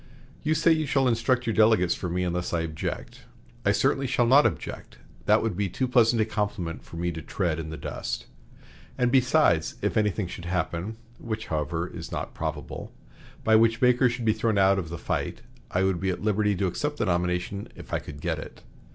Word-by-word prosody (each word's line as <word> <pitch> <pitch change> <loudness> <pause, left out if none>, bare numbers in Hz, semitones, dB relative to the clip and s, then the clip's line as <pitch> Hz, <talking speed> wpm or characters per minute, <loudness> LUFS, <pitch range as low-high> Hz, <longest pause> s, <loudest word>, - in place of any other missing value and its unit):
You 155 +1 +1
say 165 +2 +4
you 155 -2 +2
shall 135 -1 +2
instruct 125 +1 +1
your 115 - 0
delegates 110 -5 +4
for 90 - -4
me, 90 +2 -1
unless 90 0 -2
I 85 - +1
object. 80 -2 -5 0.4
I - - +3
certainly 135 -1 +1
shall 120 -1 +2
not 135 +5 +6
object. - - -6 0.3
That - - +5
would 110 -5 -1
be 100 0 -1
too 130 +8 -1
pleasant 120 -2 +4
a - - -2
compliment 105 -6 -3
for - - -12
me 85 +1 -1
to 80 -1 -6
tread 85 0 -1
in 80 -1 -5
the 80 - -6
dust. 70 - -4 0.7
And, 125 -1 +2
besides, 125 - +3
if - - 0
anything 105 -1 +1
should 90 0 -8
happen 90 +3 -2 0.2
(which, 110 -2 -4
however, 80 +3 -1
is - - -8
not - - -4
probable) 80 -4 -5 0.5
by 110 - +5
which 115 0 +4
Baker 125 0 +4
should 120 0 -4
be 110 - +4
thrown 110 -1 0
out 95 0 +4
of 85 -4 -5
the 85 - -5
fight, - - -3 0.3
I 90 - +1
would 95 -2 +1
be 95 +2 -1
at 95 - -3
liberty 105 -1 +2
to 95 - 0
accept 145 - -2
the - - 0
nomination 90 +2 -1
if - - -11
I - - +2
could 70 0 -10
get - - -1
it. - - -10
100 Hz, 210 wpm, -26 LUFS, 85-120 Hz, 0.7 s, not